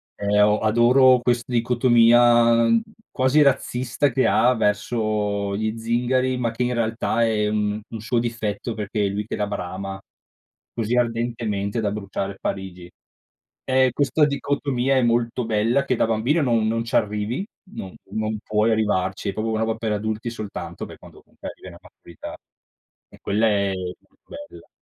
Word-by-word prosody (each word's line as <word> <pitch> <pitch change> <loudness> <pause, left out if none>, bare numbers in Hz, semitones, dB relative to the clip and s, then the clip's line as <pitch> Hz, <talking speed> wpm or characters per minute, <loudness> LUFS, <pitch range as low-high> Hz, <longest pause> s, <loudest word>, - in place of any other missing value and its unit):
E 105 0 0
o 105 +1 +4
adoro 125 +4 +5
quest 120 -1 0
dicotomia, 120 -1 +4
mhmm, 115 - +3 0.3
quasi 130 +3 +3
razzista 135 -1 +1
che 130 +2 +1
ha 125 +1 +4
verso 105 -2 -1
gli 110 +1 -2
zingari, 125 +3 0
ma 120 -2 -1
che 120 +2 -2
in 125 0 0
realtà 115 0 0
è, 105 -2 +1
mhmm, 105 0 -1
un 115 - -8
suo 115 +2 -1
difetto 115 -1 -3
perché 105 -1 -3
è - - 0
lui 105 +2 -3
che - - -4
la 105 - -1
brama 95 0 -5 0.7
così 115 +1 -1
ardentemente 115 -3 -1
da 105 -2 -1
bruciare 100 -1 -5
Parigi. 90 -2 -5 0.8
E 130 0 +4
questa 145 +3 +2
dicotomia 140 -2 -1
è - - +3
molto 120 +1 0
bella 115 +5 +1
che 130 - +1
da - - +3
bambino 115 +9 +1
non 115 -5 +1
non 115 +1 -1
ci 115 - -4
arrivi, 105 - -1 0.3
non 95 - -7 0.2
non 110 0 -2
puoi 110 +1 +1
arrivarci, 100 -3 0
è - - -3
proprio 110 +2 -3
una 110 - -1
roba 110 0 0
per 110 -1 -3
adulti 110 +2 -3
soltanto 110 -3 -7
per - - -12
quando - - -15
comunque - - -10
arrivi - - -12
alla - - -11
maturità. 85 - -11 0.7
E - - -18
quella 105 +3 +1
è 100 -2 +1
molto 90 -1 -8 0.3
bella. - - -15
115 Hz, 165 wpm, -23 LUFS, 105-120 Hz, 0.8 s, adoro